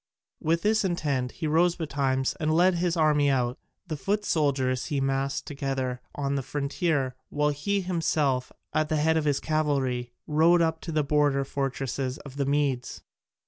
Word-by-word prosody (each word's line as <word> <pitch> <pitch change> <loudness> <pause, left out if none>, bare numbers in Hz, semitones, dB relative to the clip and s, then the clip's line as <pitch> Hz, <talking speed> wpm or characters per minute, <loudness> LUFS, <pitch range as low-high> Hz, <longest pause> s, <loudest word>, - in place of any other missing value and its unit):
With 165 +2 0
this 215 +1 +3
intent 145 -9 -1
he - - -5
rose 170 +3 +3
betimes 140 -4 -1
and 155 -1 +1
led 180 +4 +4
his 175 0 0
army 150 -2 +3
out: 125 -2 0 0.3
the 165 -4 -4
foot 205 +8 -1
soldiers 135 -6 +1
he 145 -3 -1
massed 135 0 -1
together 135 -3 -3
on 140 -1 -1
the 140 - 0
frontier, 140 0 -1 0.2
while 150 0 +1
he 195 +8 -1
himself, 155 -7 0 0.2
at 155 0 +1
the 155 - +1
head 160 +2 +2
of 160 -1 +1
his 145 -2 +2
cavalry, 135 -6 0
rode 160 +3 +4
up 160 -1 +1
to 165 - -5
the 155 -1 +1
border 145 -1 +2
fortresses 135 -1 -2
of 140 -1 -11
the 140 -1 0
Medes. 140 -3 -1
145 Hz, 170 wpm, -27 LUFS, 135-160 Hz, 0.3 s, led